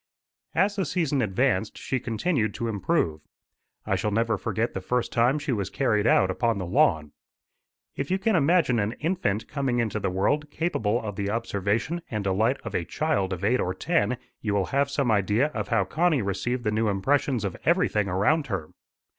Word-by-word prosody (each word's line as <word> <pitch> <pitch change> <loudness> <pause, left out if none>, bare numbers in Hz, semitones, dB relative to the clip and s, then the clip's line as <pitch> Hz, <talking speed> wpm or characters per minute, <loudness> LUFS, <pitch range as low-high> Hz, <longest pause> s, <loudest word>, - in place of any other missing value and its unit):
As 195 +4 +2
the 190 - 0
season 150 -5 0
advanced, 110 -1 0
she 130 - -2
continued 115 - -1
to 115 - -2
improve. 100 - 0 0.6
I - - +1
shall 105 - -1
never 115 +1 +1
forget 110 +3 -2
the 95 - -4
first 125 +6 -1
time 120 +5 +3
she 145 -2 -3
was 100 -5 -1
carried 110 -5 +1
out 95 -4 +4
upon 115 +2 0
the 95 - -3
lawn. 80 -3 +2 0.8
If 140 - -3
you 190 - +2
can 210 +2 +1
imagine 155 -6 +3
an 105 +2 0
infant 150 - -1
coming 135 -4 -1
into 110 -3 0
the 95 - -1
world 145 +12 0
capable 120 - 0
of 105 -3 -5
the 100 -1 -1
observation 110 - -1
and 105 -3 -3
delight 110 +7 +1
of 115 -4 -6
a 85 - 0
child 120 - -1
of 95 0 -4
eight 120 +5 +2
or 90 +1 -1
ten, 125 - 0 0.2
you 105 -2 -1
will 100 -2 +1
have 140 0 +2
some 140 -4 0
idea 105 +7 +2
of 105 -9 -4
how 105 -2 +2
Connie 155 - +1
received 110 +6 -2
the 105 - 0
new 110 +1 +1
impressions 120 +3 +1
of 95 - -3
everything 155 - +2
around 105 - +1
her. 95 -9 -3
115 Hz, 190 wpm, -26 LUFS, 100-140 Hz, 0.8 s, out